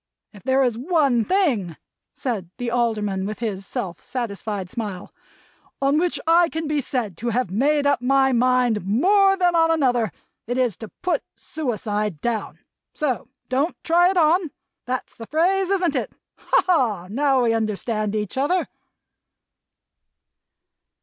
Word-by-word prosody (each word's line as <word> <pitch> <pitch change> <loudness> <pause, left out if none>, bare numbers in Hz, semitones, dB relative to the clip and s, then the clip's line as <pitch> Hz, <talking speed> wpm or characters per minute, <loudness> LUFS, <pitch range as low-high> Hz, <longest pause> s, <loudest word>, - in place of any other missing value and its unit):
If 205 - -13
there 265 +4 +2
is 240 -3 0
one 280 -6 +2
thing," 250 - 0 0.3
said 215 - -4
the 245 -2 -3
Alderman, 210 -5 0
with 215 - -5
his 200 -4 -4
self 175 -3 -5
satisfied 210 -5 -4
smile, 200 -3 -6 0.7
"on 275 +2 +2
which 350 0 0
I 335 +1 +5
can 320 0 -4
be 300 -1 0
said 240 - -2
to 235 +5 -2
have 235 -4 -1
made 285 +8 +2
up 285 -3 +2
my 270 +1 +3
mind 250 -3 +2
more 390 - +4
than 355 -2 +2
on 325 -1 +4
another, 245 - +2 0.4
it 245 +2 -2
is 245 -6 +1
to 220 - -8 0.2
Put 365 - +1
suicide 215 - -3
Down. 230 +2 -3 0.4
So 290 -6 -1 0.2
don't 275 +6 0
try 350 +2 +4
it 380 - -1
on. 335 +1 +3 0.4
That's 255 +1 -4
the 225 - -9
phrase, 370 +5 +1
isn't 365 -6 +1
it! - - -2 0.3
Ha, - - +2
ha! 235 - +1
now 265 +4 +2
we 230 -1 +2
understand 215 -1 -1
each 210 +2 -3
other." 350 +7 +1
250 Hz, 150 wpm, -23 LUFS, 215-315 Hz, 0.7 s, I